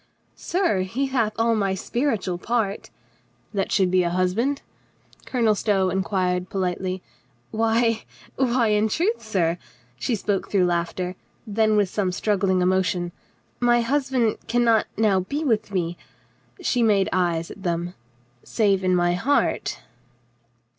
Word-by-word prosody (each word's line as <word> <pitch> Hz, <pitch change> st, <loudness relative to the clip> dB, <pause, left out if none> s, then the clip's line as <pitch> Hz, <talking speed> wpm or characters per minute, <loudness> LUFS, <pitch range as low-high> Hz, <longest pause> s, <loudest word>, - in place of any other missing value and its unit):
"Sir, 350 Hz, -, 0 dB
he 230 Hz, +9 st, -1 dB
hath 235 Hz, -5 st, 0 dB
all 230 Hz, 0 st, +2 dB
my 195 Hz, -3 st, 0 dB
spiritual 205 Hz, -5 st, -1 dB
part 215 Hz, -2 st, -1 dB, 0.2 s
— -, -, -37 dB
" -, -, -38 dB
"That 195 Hz, -2 st, -1 dB
should 190 Hz, -3 st, +2 dB
be 185 Hz, 0 st, +4 dB
a 175 Hz, -, +1 dB
husband?" 185 Hz, +11 st, 0 dB, 0.6 s
Colonel 230 Hz, -4 st, +2 dB
Stow 195 Hz, -3 st, +1 dB
in 190 Hz, +2 st, 0 dB
quired 180 Hz, -2 st, -1 dB
politely. 185 Hz, -1 st, -2 dB, 0.5 s
"Why 225 Hz, +1 st, +2 dB, 0.2 s
— -, -, -23 dB
why 245 Hz, -3 st, +2 dB
in 210 Hz, +1 st, +2 dB
truth, 400 Hz, -, 0 dB
sir," 175 Hz, -5 st, 0 dB, 0.4 s
she 245 Hz, -, 0 dB
spoke 200 Hz, -1 st, -2 dB
through 190 Hz, -3 st, +3 dB
laughter 175 Hz, +1 st, -1 dB, 0.2 s
— -, -, -39 dB
then 215 Hz, 0 st, +2 dB
with 205 Hz, -2 st, +3 dB
some 190 Hz, -1 st, -1 dB
struggling 190 Hz, -1 st, +1 dB
emotion 180 Hz, -1 st, +1 dB, 0.3 s
— -, -, -40 dB
"my 240 Hz, -1 st, +4 dB
husband 260 Hz, -2 st, +1 dB
can 240 Hz, +1 st, +2 dB
not 225 Hz, -2 st, +3 dB
now 205 Hz, -3 st, +3 dB
be 280 Hz, -, -3 dB
with 225 Hz, -7 st, +1 dB
me"' 175 Hz, -3 st, -1 dB, 0.4 s
— 120 Hz, 0 st, -23 dB
she 245 Hz, -, +1 dB
made 205 Hz, -4 st, +3 dB
eyes 170 Hz, -3 st, 0 dB
at 200 Hz, -, -11 dB
them 175 Hz, -1 st, -2 dB, 0.3 s
— -, -, -36 dB, 0.2 s
"save 200 Hz, -4 st, +1 dB
in 185 Hz, 0 st, +3 dB
my 175 Hz, 0 st, +2 dB
heart." 250 Hz, +11 st, 0 dB
200 Hz, 160 wpm, -24 LUFS, 180-230 Hz, 0.6 s, be